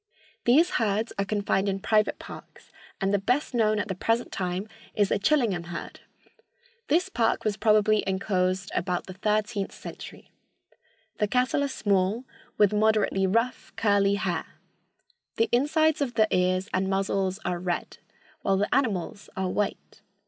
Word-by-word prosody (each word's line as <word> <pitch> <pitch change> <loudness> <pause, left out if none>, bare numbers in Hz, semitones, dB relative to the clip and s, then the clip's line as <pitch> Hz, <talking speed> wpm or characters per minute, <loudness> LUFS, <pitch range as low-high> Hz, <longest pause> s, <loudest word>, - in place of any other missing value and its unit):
These 305 +9 +5
herds 220 +1 0
are 200 - +1
confined 200 -1 0
in 195 0 -2
private 215 +1 +2
parks, - - -12 0.3
and 195 0 0
the 205 - +3
best 250 +9 0
known 215 -3 +2
at 205 - -1
the 190 - -2
present 225 +6 -1
time 185 +2 -3 0.3
is 205 -2 +2
the - - +1
Chillingham 215 - +1
herd. 170 0 -7 0.9
This 350 +5 +2
park 235 -13 0
was 210 -1 +1
probably 215 0 +3
inclosed 190 0 0
about 180 -2 -1
the 185 - -8
thirteenth 210 +1 -1
century. - - -10 0.9
The 210 - +2
cattle 255 +5 +1
are - - +1
small, 205 -2 0 0.3
with 210 -1 +4
moderately 210 -2 +2
rough, 230 +6 -1
curly 200 -2 +3
hair. 195 -4 -2 0.9
The 225 - +1
insides 310 +4 +2
of 250 -4 -1
the 220 -2 +4
ears 185 +1 +1
and 190 +1 0
muzzles 195 -1 0
are 175 -1 -1
red, 175 -1 -3 0.4
while 195 -1 +1
the 205 +2 0
animals 205 -7 -1
are 190 -1 -1
white. 205 +2 -3
205 Hz, 150 wpm, -26 LUFS, 190-225 Hz, 0.9 s, These